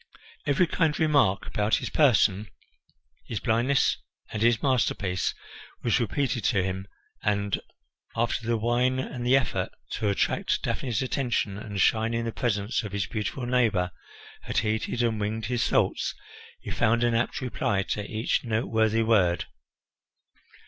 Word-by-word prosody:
Every 145 +6 +4
kind 160 -2 +1
remark 140 - +3
about 105 +1 +1
his - - -3
person, 105 -8 +3 0.8
his 110 - -3
blindness, 125 +4 +2 0.3
and 105 - -4
his 115 -1 +3
masterpiece 105 -8 0 0.5
was 120 +2 +2
repeated 120 -1 -1
to 100 -6 +2
him 95 +1 -3 0.3
and, 100 -1 0 0.5
after 115 0 -1
the 115 -1 +2
wine 120 +3 +1
and 130 -1 -4
the 125 +2 +5
effort 135 - -1 0.2
to 105 - -1
attract 100 - 0
Daphne's 125 -3 -1
attention 125 -6 -1
and 100 -1 -5
shine 115 +3 +2
in 115 0 -1
the 115 - -2
presence 110 -2 -1
of 105 -4 -7
his 100 -1 0
beautiful 110 +4 -3
neighbour 110 -8 +2 0.5
had - - -4
heated 110 +2 0
and 115 -2 0
winged 110 +1 -2
his 120 +1 0
thoughts, - - +1 0.5
he - - -6
found 115 +2 +2
an 120 -1 +2
apt 115 +2 0
reply 105 -6 -1
to 105 +2 -3
each 110 +3 -1
noteworthy 110 -1 +1
word. 95 -6 +3
115 Hz, 145 wpm, -27 LUFS, 105-125 Hz, 0.8 s, the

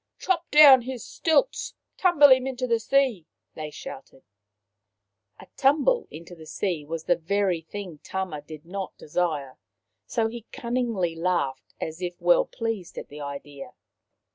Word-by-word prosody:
" - - -60
Chop 345 -3 -1
down 290 -4 +9
his 250 -1 -6
stilts! 335 +10 0 0.2
Tumble 335 -6 +6
him 260 0 +5
into 255 -1 -3
the 230 -2 +1
sea! 245 - +1
" - - -57
they 155 -1 -5
shouted. 135 -2 -10 1.2
A - - -12
tumble 305 - +3
into 170 +3 -11
the 160 -2 -12
sea 175 -5 -2
was 160 +2 -5
the 175 - +3
very 180 +1 0
thing 180 -2 -8
Tama 185 -5 -4
did 155 +1 -11
not 190 +2 -6
desire, 150 -5 -2 0.5
so 225 -2 0
he 230 0 -8
cunningly 235 -8 -1
laughed 165 -6 -2
as 160 +2 -5
if 175 -1 -4
well - - +4
pleased 225 - -5
at - - -7
the 150 +1 -9
idea. 140 0 -8
190 Hz, 155 wpm, -26 LUFS, 160-255 Hz, 1.2 s, down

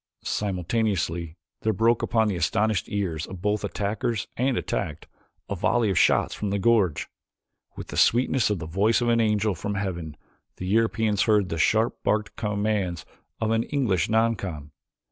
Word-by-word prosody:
Simultaneously 90 -4 -1 0.2
there 110 - +1
broke 115 +4 +2
upon 110 -2 +2
the 100 - -1
astonished 105 +3 0
ears 90 -6 -2
of 95 -2 -8
both 105 +3 -1
attackers 105 +4 -2
and 130 0 +1
attacked - - -3 0.4
a 100 - -3
volley 110 +3 +1
of 95 - +2
shots - - +3
from 105 - -3
the 100 - 0
gorge. 100 -5 +2 0.7
With - - -8
the - - -6
sweetness 125 -1 +3
of 105 - 0
the 80 - -6
voice 100 +9 +2
of 120 - +1
an 115 0 +3
angel 105 -1 +1
from 100 +4 -4
heaven 85 -6 -4 0.4
the 90 - -6
Europeans 110 0 +1
heard 105 -4 +3
the 80 - -3
sharp 110 +7 +2
barked 105 0 0
commands 105 -5 -1 0.3
of 110 0 0
an 115 0 +2
English 115 - 0
noncom. 100 -10 -1
105 Hz, 165 wpm, -25 LUFS, 90-110 Hz, 0.7 s, shots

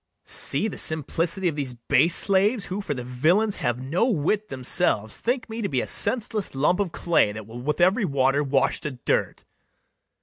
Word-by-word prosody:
[Exeunt - - -51
three - - -9
JEWS.] - - 0
See - - +1
the 215 - -6
simplicity 165 +4 0
of 160 - -1
these 140 -4 -3
base 160 +8 +2
slaves, 200 +3 +3
Who, 190 +3 -4
for 150 -7 -4
the 125 - -5
villains 165 - +1
have 120 -2 -2
no 150 - 0
wit 210 - -1
themselves, 130 - 0
Think 245 0 -2
me 225 0 -6
to 200 - -2
be 130 - 0
a - - -2
senseless 215 - 0
lump 150 +7 +1
of 195 -4 -1
clay, 165 -13 +1
That 110 0 -8
will 115 +3 -9
with 150 +6 -2
every 190 +6 +3
water 140 -1 +1
wash 135 -1 0
to 150 - -3
dirt! 125 -3 -2
160 Hz, 205 wpm, -24 LUFS, 130-200 Hz, -, slaves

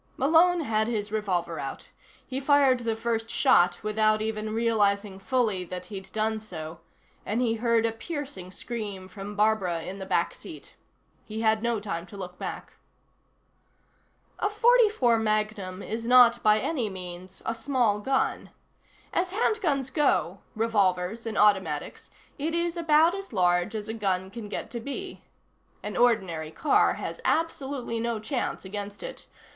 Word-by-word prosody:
Malone 335 +5 +4
had 220 -6 0
his 210 -3 -2
revolver 180 -6 -1
out. 135 -1 -6 0.4
He 265 0 -4
fired 275 -2 +4
the 230 -2 -1
first 225 0 -2
shot 180 -10 +3
without 215 0 +2
even 215 0 -3
realizing 210 -3 +1
fully 215 -4 0
that 180 +1 -6
he'd 190 -1 -7
done 220 0 0
so, 165 -6 -8 0.4
and 215 +4 -1
he 240 -2 +2
heard 230 0 +2
a 230 - +2
piercing 225 - -6
scream 205 -3 -6
from 200 +2 -8
Barbara 205 -6 +1
in 195 +3 -6
the 190 - -6
back - - +1
seat. - - -11 0.5
He 220 +1 -6
had 220 -1 +3
no 235 -1 0
time 175 -4 -5
to 200 - -11
look 180 -2 -8
back. - - -6 1.6
A - - +1
.44 425 - +4
Magnum 215 -3 -1
is 230 +1 -4
not, 245 -1 +7
by 215 0 +4
any 240 -2 -1
means, 185 0 -9
a 225 - 0
small 230 -3 +1
gun. 265 +5 0 0.6
As 360 +1 0
handguns 340 - 0
go 295 0 +1 0.2
revolvers 215 -1 +1
and 220 - -3
automatics 190 -8 +1 0.3
it 320 +4 -1
is 340 0 0
about 325 0 +4
as 390 0 -6
large 180 +1 +2
as 210 -1 -4
a 220 - -3
gun 190 -4 -1
can 215 -1 -7
get 210 - -5
to 235 - -4
be. 285 +10 -6 0.6
An 210 0 -5
ordinary 190 -10 +2
car 275 - +2
has - - -6
absolutely 275 -7 -1
no 235 0 -1
chance 245 -2 -3
against 205 +1 -6
it. - - -8
220 Hz, 150 wpm, -27 LUFS, 195-255 Hz, 1.6 s, not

